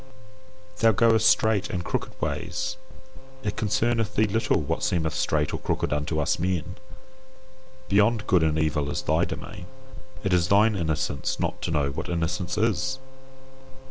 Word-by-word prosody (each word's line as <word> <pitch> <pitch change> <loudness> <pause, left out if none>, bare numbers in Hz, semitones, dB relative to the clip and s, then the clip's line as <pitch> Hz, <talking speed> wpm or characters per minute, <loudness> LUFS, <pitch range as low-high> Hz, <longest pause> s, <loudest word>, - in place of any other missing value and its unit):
Thou 115 -1 +5
goest 110 0 +4
straight 105 -1 +2
and 90 -1 -3
crooked - - -4
ways; - - -3 0.7
it 105 - -2
concerneth 110 +1 0
thee 110 - +3
little 110 +2 +1
what 80 +1 -2
seemeth 80 -4 0
straight 75 -1 0
or - - -2
crooked - - -1
unto 75 +2 -1
us 75 - 0
men. 90 0 -2 1.1
Beyond 105 +2 +3
good 90 -3 +3
and 80 -1 +1
evil 75 -2 0
is - - -3
thy - - +2
domain. 90 0 -7 0.6
It 95 -2 0
is 85 -1 +3
thine 105 +3 +4
innocence 80 -5 -2
not - - -2
to - - -2
know 75 -4 0
what 70 - -5
innocence 85 +2 -2
is. 115 +5 0
90 Hz, 150 wpm, -25 LUFS, 80-110 Hz, 1.1 s, Thou